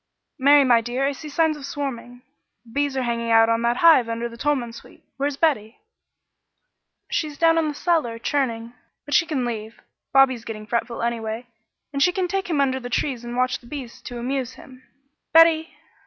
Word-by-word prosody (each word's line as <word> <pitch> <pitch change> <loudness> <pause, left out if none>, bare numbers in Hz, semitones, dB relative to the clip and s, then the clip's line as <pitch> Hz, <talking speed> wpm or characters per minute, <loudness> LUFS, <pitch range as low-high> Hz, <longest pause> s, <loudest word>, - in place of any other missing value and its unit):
"Mary, 285 +2 +6
my 240 -3 +4
dear, 245 +4 -2
I 280 - +1
see 300 +2 -9
signs 320 +1 +1
of 295 - -11
swarming. 250 -3 -6 0.4
The 230 - -17
bees 285 +1 -1
are 260 - 0
hanging 235 -1 -2
out 225 0 +5
on 230 0 +1
that 235 +1 +1
hive 315 -9 +5
under 230 +1 -2
the 235 - -11
Tolman 250 -2 -1
Sweet. - - -14
Where's 280 0 -2
Betty?" 245 -9 0 1.3
"She's 300 -3 -2
down 330 -1 +3
cellar 310 -9 0
churning, 235 -2 -2 0.3
but 290 - -6
she 335 - +4
can 270 -6 -1
leave. 220 -1 -5 0.3
Bobby's 265 -3 +4
getting 215 -2 -7
fretful, 235 +2 -2
anyway, 230 0 -3 0.5
and 280 - -2
she 360 - +5
can 370 0 -1
take 385 +1 -3
him 310 -4 0
under 265 -2 +1
the 245 -1 -7
trees 250 -1 -2
and 240 +1 -6
watch 255 0 +1
the 240 - -18
bees 255 -3 -8
and 245 - -7
amuse 255 0 -3
him. 255 -2 -15 0.5
Betty!" 325 0 +6
255 Hz, 185 wpm, -23 LUFS, 235-290 Hz, 1.3 s, Mary